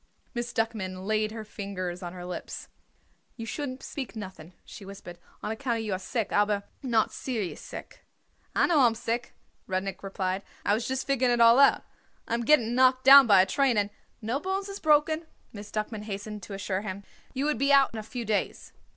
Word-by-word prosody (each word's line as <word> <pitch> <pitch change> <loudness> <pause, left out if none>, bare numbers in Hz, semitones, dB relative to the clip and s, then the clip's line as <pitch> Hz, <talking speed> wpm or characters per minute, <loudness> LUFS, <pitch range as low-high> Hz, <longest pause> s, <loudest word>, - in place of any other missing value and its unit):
Miss 240 0 -3
Duckman 190 -5 -2
laid 215 0 0
her 220 0 -6
fingers 185 -4 -5
on 175 -1 -5
her 180 0 -8
lips. 180 0 -7 0.7
"You 230 - -5
shouldn't 260 +1 -5
speak 265 -4 -6
nothing," 185 -5 -8
she 220 - -11
whispered, 190 -3 -10 0.2
"on 210 - -2
account 230 -1 -2
you 210 -3 -2
are 185 - -2
sick, 215 +3 -3
aber 205 -1 +2 0.2
not 230 -5 +1
serious 225 -8 -4
sick." - - -10 0.5
"I - - +4
know 330 -4 +3
I 255 - +7
am 225 - 0
sick," 230 +1 -3 0.3
Rudnik 190 +1 -3
replied. 190 -1 -2 0.2
"I 205 - +3
was 225 +3 -1
just 265 0 -2
figuring 260 -3 +2
it - - -3
all 230 +2 +7
out. 280 - +5 0.4
I - - -3
am 235 - +1
getting 240 -5 +4
knocked 255 +1 +4
down 275 -1 +10
by 195 -3 +7
a - - -1
train 255 +4 +2
and 205 0 +1 0.2
" - - -40
"No 235 +6 -1
bones 385 +3 -3
is 395 - -6
broken," 310 +1 +3 0.3
Miss 205 -1 -9
Duckman 215 0 -4
hastened 210 0 -6
to 195 +2 -7
assure 195 -1 -2
him. 200 -1 -6 0.3
"You 270 +2 0
would 300 -6 0
be 275 +1 +3
out 275 -1 +6
in 225 - -4
a - - -3
few 235 +2 -6
days." 215 -1 -2
220 Hz, 205 wpm, -28 LUFS, 200-255 Hz, 0.7 s, down